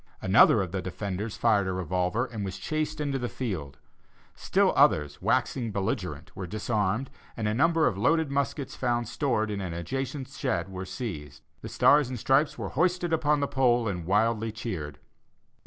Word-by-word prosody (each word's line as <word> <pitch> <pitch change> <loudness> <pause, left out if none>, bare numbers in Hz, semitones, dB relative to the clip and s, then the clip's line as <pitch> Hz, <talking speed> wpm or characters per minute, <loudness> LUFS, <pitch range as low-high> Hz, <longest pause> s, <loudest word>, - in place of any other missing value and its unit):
Another 100 +2 +5
of 90 - -6
the 95 0 -2
defenders 100 +3 -4
fired 105 -4 +3
a 95 - -1
revolver, 90 +5 -1
and 110 -5 -6
was 95 -1 -4
chased 155 0 -3
into 140 -2 -1
the 120 -1 -3
fields. 85 - -5 0.6
Still - - +2
others, 75 -2 +3
waxing 120 -4 0
belligerent, 95 - -3
were 95 - -5
disarmed, 110 +4 -1 0.3
and 110 -2 -1
a 105 - +1
number 165 +5 +3
of 95 - 0
loaded 160 +5 +2
muskets 140 0 -2
found 120 -2 -1
stored 110 -7 0
in 100 -1 -3
an 90 -3 -4
adjacent 135 - -4
shed 115 -10 -2
were 95 0 -6
seized. 90 - -6 0.2
The - - -7
stars 145 -3 +4
and 130 - -4
stripes 135 +6 +2
were - - -4
hoisted 175 +2 +1
upon 150 -2 +2
the 140 - +1
pole, 120 -4 +2
and 90 -5 -4
wildly 110 +3 +1
cheered. 90 -11 -5
110 Hz, 170 wpm, -27 LUFS, 95-135 Hz, 0.6 s, Another